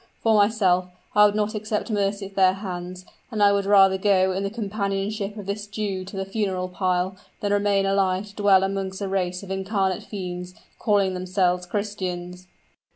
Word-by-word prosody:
For 225 - +4
myself, 200 -4 +3 0.3
I 210 0 +7
would 205 - -2
not 215 0 0
accept 215 +1 -3
mercy 200 -1 0
at 195 - -10
their 185 -1 +4
hands; 185 -2 -6 0.2
and 215 -4 0
I 200 - +6
would 200 -1 0
rather 195 -2 +5
go 190 -1 +3
in 190 +1 -2
the 200 - -1
companionship 205 -1 -3
of 205 - -7
this 205 +1 -4
Jew 205 -2 -3
to 195 +1 -8
the 195 - -2
funeral 190 -3 -2
pile, 185 0 0 0.2
than 205 -1 0
remain 200 -1 +2
alive 195 0 +1
to 200 - -17
dwell 200 -2 +4
amongst 195 0 -3
a - - -2
race 185 -1 -2
of 195 - -8
incarnate 190 -1 -1
fiends, 180 -2 -6 0.2
calling 200 -4 +2
themselves 180 -1 0
Christians!" 180 -3 -4
195 Hz, 180 wpm, -24 LUFS, 185-205 Hz, 0.3 s, I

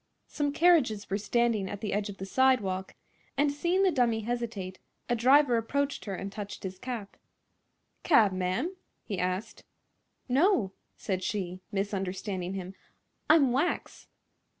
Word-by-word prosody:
Some 290 -1 -1
carriages 285 - +3
were 200 - +1
standing 225 -2 +1
at 205 - -5
the 210 -1 -3
edge 205 +1 -1
of 200 - -8
the 190 - -5
sidewalk, 195 -6 +1 0.4
and 285 0 +3
seeing 345 +6 +1
the 380 - +4
dummy 240 -6 +2
hesitate 220 -5 -4 0.3
a 240 - +1
driver 255 +1 +5
approached 280 +5 -1
her 200 -3 -3
and 195 +2 -5
touched 205 0 -7
his 190 -1 -6
cap. 235 -5 -6 0.8
"Cab, 225 - +5
ma'am?" 185 - -1 0.3
he 200 -5 -4
asked. 185 +3 -3 0.6
"No," 265 - +3 0.3
said 185 -2 -2
she, 185 -3 -3
misunderstanding 195 -2 -3
him; 185 0 -6 0.6
"I'm 300 -5 +6
wax." 280 +8 -1
215 Hz, 140 wpm, -29 LUFS, 195-265 Hz, 0.8 s, I'm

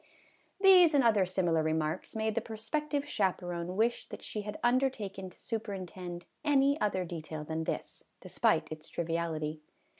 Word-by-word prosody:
These 365 -5 +7
and 275 - +5
other 210 -5 +4
similar 175 -3 +1
remarks 155 +4 -1
made 220 0 0
the 230 - 0
pro 220 0 -7
spective 285 +6 -2
chaperon 180 -7 -1
wish 235 +2 +1
that - - -9
she 215 - -4
had 210 0 -6
undertaken 240 -7 0
to - - -19
superintend 185 -5 -5 0.2
any 285 0 +3
other 190 -3 +1
detail 155 -2 -6
than 160 +1 -3
this, - - -4 0.2
despite - - +1
its 155 0 -7
triviality. 160 -2 -2
195 Hz, 150 wpm, -31 LUFS, 170-235 Hz, 0.2 s, These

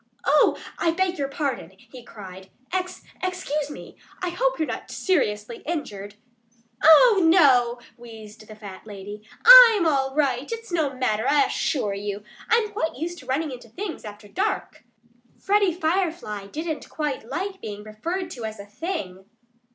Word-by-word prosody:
"Oh! 295 +1 +4 0.2
I - - +2
beg 360 0 -1
your 275 - 0
pardon!" 270 - -4
he 245 +4 -14
cried. 190 -4 -11 0.2
"Ex 365 -1 -3 0.2
excuse 360 -6 -2
me! 295 - -11 0.2
I 365 - -2
hope - - 0
you're 315 -2 -1
not - - -6
seriously 230 - -1
injured?" 210 - -5 0.7
"Oh, 390 +6 +7
no!" 265 -8 +5 0.2
wheezed 220 -2 -12
the 215 - -11
fat 205 -1 -11
lady. 205 0 -9 0.2
"I'm 475 -6 +10
all 270 -3 +1
right. 275 - 0
It's 460 -3 -6
no 315 -5 0
matter, 245 -3 -1
I 285 -1 +4
assure 215 -9 -1
you. 205 +1 -5 0.3
I'm 450 -2 +2
quite 325 -6 -2
used 345 +4 -5
to 255 - -15
running 285 +3 -1
into 245 -2 -10
things 370 - -6
after 210 -1 -10
dark." 385 - -3 0.6
Freddie 400 -1 +2
Firefly 320 - -2
didn't 315 +6 -5
quite 290 -7 -4
like 380 +1 -4
being 210 -1 -7
referred 335 - -5
to 245 -7 -8
as 220 -1 -6
a 200 - -8
THING. 205 - -6
285 Hz, 155 wpm, -24 LUFS, 215-355 Hz, 0.7 s, I'm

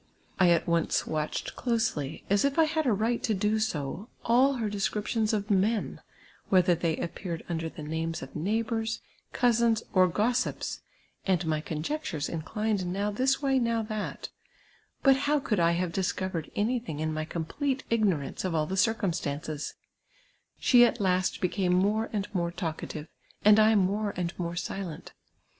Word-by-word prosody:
I 185 -2 +6
at 170 -1 +3
once 170 -1 +1
watched 155 -1 -3
closely, 220 - -1
as 200 +1 +3
it' 280 +1 +1
I 325 - +7
had 315 -2 0
a - - +4
right 225 +3 +1
to 220 - 0
do 210 +3 +1
so, 190 - -3 0.2
all 255 +4 +4
her 235 -5 -2
descriptions 210 +2 0
of 210 -1 -1
men, 205 +3 +1 0.5
whether 180 -2 +5
they 170 -1 0
ajipeared 170 0 -5
under 165 -1 -2
the 155 - -9
names 160 +1 -3
of 135 - -11
neighbours, 225 +4 -1 0.3
cousins, 235 -2 +2
or 185 -1 +6
gossips, 235 +8 -1 0.5
and 180 -2 +2
my 155 -1 0
conjectures 160 - -3
inclined 200 +4 -2
now 200 +2 -1
this 265 +6 +1
way, 270 -1 +3
now 230 -2 +1
that; 215 -1 -4 0.7
but 270 -1 +7
how 290 +2 +1
could 215 -7 -1
I 170 0 +4
have 175 0 -1
dis 190 0 +1
covered 185 -4 -3
anything 220 -7 -1
in 155 0 -1
my 155 0 -2
complete 255 - -2
ignorance 195 -11 +1
of 185 -3 -1
all 155 -1 +2
the 190 +5 -3
circum 220 -3 +2
stances 150 0 -4 0.4
} - - -37
She 245 -2 +6
at 240 0 +3
last 185 -2 +1
became 180 0 +1
more 210 +5 +2
and 205 -2 -2
more 170 -3 0
talkative, 160 -3 -5 0.4
and 210 0 +8
I 215 +1 +5
more 205 +1 +1
and 175 -1 -2
more 170 -1 -2
silent. 175 -2 -5
200 Hz, 165 wpm, -28 LUFS, 170-225 Hz, 0.7 s, and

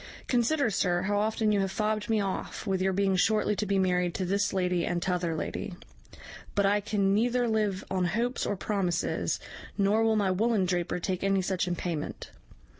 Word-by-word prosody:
Consider, 245 +1 +2
sir, 180 -2 +1
how 205 +1 +1
often 220 0 +1
you 205 - +2
have 195 -1 0
fobbed 215 +1 -1
me 220 -1 +2
off 195 +1 -3
with 190 -2 0
your 190 0 +2
being 195 0 +1
shortly 210 +2 +2
to 210 - -1
be 200 0 +1
married 180 -2 +1
to 185 - -1
this 200 +3 +1
lady 180 -2 0
and 175 +1 -1
t'other 175 -2 -1
lady; 180 +4 -4 0.8
but 200 -1 +3
I 205 +1 +3
can 200 -1 +1
neither 240 +3 +2
live 210 -4 0
on 185 -1 +1
hopes 230 +8 -1
or 205 - -1
promises, 185 -4 -1 0.4
nor 205 +2 +3
will 225 0 +3
my 200 -3 +2
woollen 210 +1 +2
draper 175 -1 -1
take 185 +1 -3
any 195 -1 +2
such 185 -1 -1
in 175 - -1
payment. 170 -4 -4
195 Hz, 190 wpm, -28 LUFS, 185-215 Hz, 0.8 s, but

